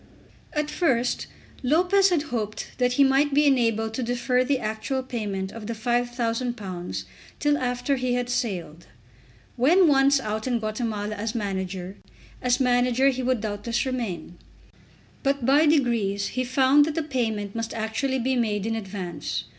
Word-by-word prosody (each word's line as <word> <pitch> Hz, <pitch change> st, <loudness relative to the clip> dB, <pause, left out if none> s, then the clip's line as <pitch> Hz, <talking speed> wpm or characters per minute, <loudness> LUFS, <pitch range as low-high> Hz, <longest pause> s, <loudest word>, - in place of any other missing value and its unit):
At 300 Hz, -1 st, -1 dB
first 255 Hz, -7 st, 0 dB, 0.3 s
Lopez 360 Hz, +8 st, +4 dB
had 335 Hz, -5 st, +1 dB
hoped 215 Hz, -2 st, -3 dB
that 250 Hz, 0 st, +2 dB
he 280 Hz, -, +5 dB
might 275 Hz, +1 st, +3 dB
be 295 Hz, +1 st, +5 dB
enabled 230 Hz, -5 st, +2 dB
to 255 Hz, -, -3 dB
defer 245 Hz, +1 st, +1 dB
the 270 Hz, +1 st, +1 dB
actual 220 Hz, +4 st, -3 dB
payment 205 Hz, -6 st, -4 dB
of 225 Hz, -2 st, -8 dB
the 230 Hz, -, -3 dB
£5000 230 Hz, -, -2 dB, 0.4 s
till 295 Hz, 0 st, +2 dB
after 250 Hz, +1 st, -1 dB
he 250 Hz, -1 st, 0 dB
had 245 Hz, 0 st, -1 dB
sailed. 190 Hz, -, -3 dB, 0.7 s
When 335 Hz, +9 st, +5 dB
once 275 Hz, -1 st, +5 dB
out 215 Hz, -1 st, -3 dB
in 245 Hz, -2 st, +1 dB
Guatemala 215 Hz, -1 st, -3 dB
as 215 Hz, +2 st, -4 dB
manager, 190 Hz, -3 st, -3 dB, 0.4 s
as 250 Hz, 0 st, +2 dB
manager 250 Hz, +1 st, +3 dB
he 260 Hz, -1 st, -2 dB
would 255 Hz, -3 st, 0 dB
doubtless 215 Hz, +3 st, -2 dB
remain. 230 Hz, -9 st, -4 dB, 0.8 s
But 275 Hz, -3 st, 0 dB
by 290 Hz, +4 st, +5 dB
degrees 230 Hz, -9 st, +1 dB
he 255 Hz, -, -2 dB
found 265 Hz, +3 st, +4 dB
that 305 Hz, -1 st, -3 dB
the 325 Hz, -, 0 dB
payment 220 Hz, -8 st, -2 dB
must 230 Hz, 0 st, -3 dB
actually 225 Hz, +5 st, -1 dB
be 260 Hz, +1 st, 0 dB
made 215 Hz, -4 st, 0 dB
in 225 Hz, 0 st, -1 dB
advance. 185 Hz, -7 st, -4 dB
245 Hz, 155 wpm, -25 LUFS, 215-265 Hz, 0.8 s, he